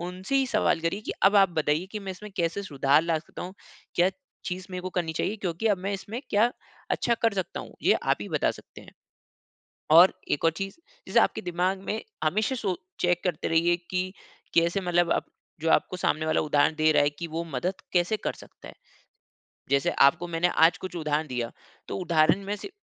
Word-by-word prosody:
उनसे 185 Hz, +9 st, -3 dB
ही 270 Hz, -1 st, +3 dB
सवाल 215 Hz, -7 st, +1 dB
करिए 170 Hz, +5 st, -1 dB
कि -, -, -1 dB
अब 200 Hz, +1 st, +6 dB
आप 195 Hz, -2 st, +6 dB
बताइए 155 Hz, +1 st, 0 dB
कि 210 Hz, -, -3 dB
मैं 195 Hz, -1 st, -6 dB
इसमें 210 Hz, +3 st, -10 dB
कैसे 170 Hz, +3 st, -1 dB
सुधार 145 Hz, -2 st, +2 dB
ला 165 Hz, -1 st, +1 dB
सकता 155 Hz, -, -10 dB
हूँ? 185 Hz, +2 st, -7 dB, 0.4 s
क्या 180 Hz, +2 st, +4 dB, 0.3 s
चीज़ 180 Hz, +1 st, -4 dB
मेरे 180 Hz, 0 st, -4 dB
को 185 Hz, -, -4 dB
करनी 170 Hz, -3 st, -2 dB
चाहिए, 210 Hz, +7 st, -2 dB
क्योंकि 185 Hz, +2 st, -3 dB
अब 200 Hz, -3 st, +2 dB
मैं 195 Hz, +2 st, -3 dB
इसमें 210 Hz, +5 st, -5 dB
क्या 225 Hz, +4 st, +3 dB, 0.4 s
अच्छा 235 Hz, -, +1 dB
कर 225 Hz, -2 st, +3 dB
सकता 190 Hz, -3 st, -3 dB
हूँ, -, -, -11 dB
ये -, -, +5 dB
आप -, -, +1 dB
ही -, -, -7 dB
बता -, -, +1 dB
सकते -, -, -12 dB
हैं। -, -, -14 dB, 1.0 s
और 175 Hz, +4 st, +8 dB, 0.2 s
एक 145 Hz, -, 0 dB
और 165 Hz, -, +5 dB
चीज़, 195 Hz, +4 st, -5 dB, 0.3 s
जैसे -, -, +4 dB
आपके -, -, +1 dB
दिमाग 180 Hz, +2 st, -1 dB
में 220 Hz, -, -1 dB, 0.2 s
हमेशा 215 Hz, -, +1 dB
सो 195 Hz, -7 st, -2 dB, 0.2 s
चेक 175 Hz, 0 st, +1 dB
करते 175 Hz, -5 st, -1 dB
रहिए 170 Hz, +1 st, +3 dB, 0.2 s
कि, 185 Hz, 0 st, -1 dB, 0.4 s
कैसे 170 Hz, +3 st, +2 dB
मतलब 175 Hz, -1 st, +1 dB
आप -, -, +1 dB, 0.4 s
जो 165 Hz, -, 0 dB
आपको 185 Hz, -, +2 dB
सामने 155 Hz, -2 st, 0 dB
वाला -, -, +2 dB
उदाहरण 150 Hz, +1 st, +2 dB
दे 155 Hz, 0 st, +3 dB
रहा 145 Hz, -, +4 dB
है 145 Hz, -, +3 dB
कि 165 Hz, +4 st, -7 dB
वो 165 Hz, +2 st, -3 dB
मदद 180 Hz, +9 st, -1 dB, 0.2 s
कैसे 180 Hz, +5 st, +2 dB
कर -, -, -3 dB
सकता -, -, -14 dB
है। -, -, -11 dB, 1.0 s
जैसे 140 Hz, -1 st, +3 dB, 0.2 s
आपको 175 Hz, +5 st, +1 dB
मैंने 170 Hz, +1 st, +1 dB
आज 165 Hz, +3 st, +4 dB
कुछ 185 Hz, -1 st, -7 dB
उदाहरण 155 Hz, -1 st, -1 dB
दिया, 120 Hz, -2 st, -3 dB, 0.4 s
तो -, -, -3 dB
उदाहरण 170 Hz, +2 st, +2 dB
में 205 Hz, +1 st, -2 dB
से 395 Hz, -, -9 dB
175 Hz, 210 wpm, -27 LUFS, 160-195 Hz, 1.0 s, और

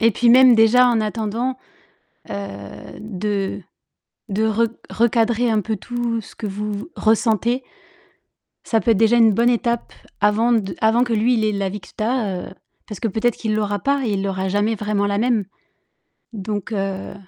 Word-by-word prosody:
et 230 Hz, 0 st, +5 dB
puis 235 Hz, +3 st, +2 dB
même 255 Hz, 0 st, +7 dB
déjà 230 Hz, +3 st, +5 dB
en 235 Hz, -2 st, +2 dB
attendant, 225 Hz, +4 st, -2 dB, 0.7 s
heu, -, -, -3 dB, 0.7 s
de 205 Hz, -1 st, -3 dB, 0.7 s
de 215 Hz, +3 st, +1 dB
re 225 Hz, +1 st, +1 dB, 0.2 s
recadrer 235 Hz, +1 st, +2 dB
un 215 Hz, -1 st, +2 dB
peu 220 Hz, +2 st, -3 dB
tout 240 Hz, +2 st, -3 dB
ce -, -, -15 dB
que 215 Hz, -, -6 dB
vous 210 Hz, +2 st, -4 dB
v 205 Hz, +1 st, -5 dB
ressentez 225 Hz, +3 st, +1 dB, 1.0 s
ça 225 Hz, -, +1 dB
peut 230 Hz, -, +2 dB
être 220 Hz, -, +3 dB
déjà 225 Hz, +3 st, +4 dB
une 225 Hz, -3 st, +5 dB
bonne 235 Hz, +3 st, +3 dB
étape 235 Hz, -1 st, -1 dB, 0.3 s
avant 210 Hz, +3 st, +2 dB
de 200 Hz, -6 st, 0 dB
avant 225 Hz, +3 st, +4 dB
que 240 Hz, -, -2 dB
lui 225 Hz, +3 st, +2 dB
il 220 Hz, -2 st, +1 dB
ait 215 Hz, -, +2 dB
la 200 Hz, -2 st, -2 dB
vie 205 Hz, +2 st, -6 dB
que -, -, -15 dB
tu 215 Hz, -, -6 dB
as, 215 Hz, -6 st, -1 dB
heu -, -, -13 dB, 0.3 s
parce 210 Hz, -, -8 dB
que 230 Hz, -, -1 dB
peut-être 225 Hz, +3 st, 0 dB
qu'il 215 Hz, -2 st, -2 dB
l'aura 205 Hz, -1 st, -1 dB
pas, 280 Hz, +7 st, 0 dB
il 200 Hz, -2 st, -1 dB
aura 190 Hz, 0 st, -2 dB
jamais 205 Hz, +3 st, +1 dB
vraiment 210 Hz, -1 st, -1 dB
la 200 Hz, 0 st, 0 dB
même. 225 Hz, -2 st, +1 dB, 0.9 s
Donc, 205 Hz, 0 st, -5 dB
heu 195 Hz, -1 st, -3 dB
220 Hz, 185 wpm, -20 LUFS, 205-235 Hz, 1.0 s, même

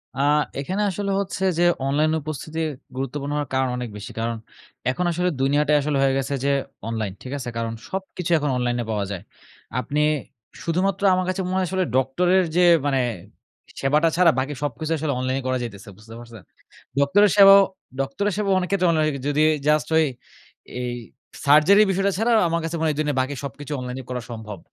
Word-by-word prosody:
আ -, -, -6 dB, 0.4 s
এখানে 185 Hz, +9 st, -2 dB
আসলে 200 Hz, +1 st, -3 dB
হচ্ছে 190 Hz, -1 st, -3 dB, 0.2 s
যে, -, -, +4 dB, 0.2 s
অনলাইন 150 Hz, +3 st, +2 dB
উপস্থিতি 155 Hz, +2 st, -6 dB, 0.4 s
গুরুত্বপূর্ণ 135 Hz, +2 st, -4 dB
হওয়ার 145 Hz, -3 st, -2 dB
কারণ 130 Hz, -1 st, +1 dB
অনেক 125 Hz, -1 st, -4 dB
বেশি। 100 Hz, -, -8 dB
কারণ 115 Hz, +1 st, -1 dB, 0.6 s
এখন 180 Hz, +7 st, -2 dB
আসলে 180 Hz, +2 st, 0 dB
দুনিয়াটাই 145 Hz, +2 st, +3 dB
আসলে 145 Hz, 0 st, -1 dB
হয়ে 135 Hz, -1 st, +3 dB
গেছে 135 Hz, +1 st, -2 dB
যে -, -, +2 dB, 0.4 s
অনলাইন, 110 Hz, -4 st, -3 dB
ঠিক 130 Hz, -, -8 dB
আছে? 130 Hz, -3 st, -5 dB
কারণ 115 Hz, 0 st, -2 dB, 0.2 s
সবকিছু 190 Hz, -2 st, -4 dB
এখন 150 Hz, -1 st, -1 dB
অনলাইনে 120 Hz, -1 st, -1 dB
পাওয়া 105 Hz, -2 st, -1 dB
যায়। 95 Hz, -3 st, -5 dB, 0.6 s
আপনি 145 Hz, +5 st, -1 dB, 0.6 s
শুধুমাত্র 185 Hz, +4 st, 0 dB
আমার 185 Hz, 0 st, +1 dB
কাছে 185 Hz, +1 st, -1 dB
মনে 185 Hz, -, -1 dB
হয় 185 Hz, -, +1 dB
আসলে 190 Hz, 0 st, 0 dB
ডক্টরের 175 Hz, +8 st, +2 dB
যে 180 Hz, -, +4 dB, 0.2 s
মানে 135 Hz, -2 st, +2 dB, 0.8 s
সেবাটা 150 Hz, +4 st, +3 dB
ছাড়া 175 Hz, -3 st, +6 dB
বাকি 135 Hz, +3 st, -2 dB
সবকিছু 145 Hz, +3 st, -3 dB
আসলে 150 Hz, -2 st, -1 dB
অনলাইনে 130 Hz, +1 st, -1 dB
করা 130 Hz, -, +1 dB
যাইতেছে, 105 Hz, -2 st, -8 dB
বুঝতে 110 Hz, +1 st, -14 dB
পারছেন? 115 Hz, -3 st, -12 dB, 0.6 s
ডক্টরের 200 Hz, +9 st, +4 dB
সেবাও 200 Hz, 0 st, +9 dB, 0.4 s
ডক্টরের 140 Hz, +10 st, -1 dB
সেবাও 200 Hz, -2 st, +1 dB
অনেক 180 Hz, -1 st, -2 dB
ক্ষেত্রে 185 Hz, -3 st, +2 dB
অনলাইনে 155 Hz, -2 st, +2 dB
হয় 150 Hz, -, -2 dB
যদি 145 Hz, +1 st, +2 dB, 0.3 s
জাস্ট 150 Hz, 0 st, +2 dB
ওই 160 Hz, -, +5 dB, 0.8 s
এই 125 Hz, -1 st, -3 dB, 0.5 s
সার্জারির 155 Hz, +9 st, +6 dB
বিষয়টা 195 Hz, +1 st, +1 dB
ছাড়া 225 Hz, +3 st, +1 dB
আ -, -, +4 dB
আমার 170 Hz, 0 st, 0 dB
কাছে 165 Hz, +1 st, -3 dB
মনে 160 Hz, -, 0 dB
হয় 150 Hz, -, 0 dB
এই -, -, -9 dB
দুনিয়ায় 145 Hz, -3 st, -1 dB
বাকি 130 Hz, +2 st, -1 dB
সবকিছু 145 Hz, +2 st, -7 dB
অনলাইনে 125 Hz, +1 st, -5 dB
করা 125 Hz, -1 st, -3 dB
সম্ভব। 110 Hz, -4 st, -7 dB
145 Hz, 185 wpm, -23 LUFS, 130-180 Hz, 0.8 s, সেবাও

